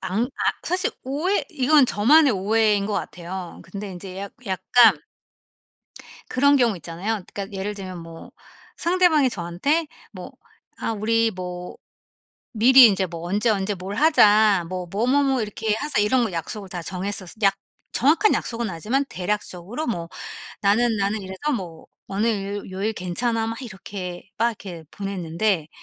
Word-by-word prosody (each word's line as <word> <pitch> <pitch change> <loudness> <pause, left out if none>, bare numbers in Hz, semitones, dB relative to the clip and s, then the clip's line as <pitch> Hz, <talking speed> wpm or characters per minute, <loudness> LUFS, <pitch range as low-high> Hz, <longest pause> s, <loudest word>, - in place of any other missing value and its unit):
안 210 +6 -1
아 270 - -1
사실 365 +1 0
오해 305 +10 0
이건 290 -2 +4
저만의 275 +7 +5
오해인 210 +1 +2
것 215 - -3
같아요. 180 -2 -5
근데 200 +3 -7
인제 185 +1 -8
약 200 0 -6
약간 195 0 +4 1.3
그런 280 +3 +4
경우 240 -6 +3
있잖아요. 175 +7 -3 0.2
그니까 200 0 -5
예를 195 +2 -3
들면 185 -3 -7
뭐 165 0 -11 0.5
상대방이 340 -6 +3
저한테 220 - -1 0.2
뭐 - - -9 0.5
아 - - -2
우리 225 +1 +1
뭐 180 -2 -7 0.8
미리 250 +4 +8
인제 195 -3 +4
뭐 170 -1 -8
"언제, 205 +6 0
언제 205 -2 +1
뭘 190 +1 -6
하자 210 - +5
뭐 185 -1 -4
뭐, 215 +4 0
뭐, 280 +3 +3
뭐 270 -2 +1
이렇게 215 0 -2
하자." 275 +1 -1
이런 245 +4 +3
거 225 -5 -1
약속을 190 +4 -5
다 180 -2 -5
정했었 185 +1 -4
약 195 -2 +4 0.4
정확한 325 - +3
약속은 230 -1 -2
아니지만 220 - -1
대략적으로 205 - -4
뭐 170 -8 -3 0.5
"나는, 220 +3 +2
나는 200 +1 -1
이래서 190 +11 -3
뭐 170 -5 -8 0.2
어느 200 +3 0
요 205 -2 -2
요일 195 +4 -2
괜찮아." 225 +5 -1
막 225 +3 -5
이렇게 190 -5 -7
막 230 +2 +2
이렇게 185 -7 -8
보냈는데 185 -3 -2
205 Hz, 300 characters per minute, -23 LUFS, 185-240 Hz, 1.3 s, 미리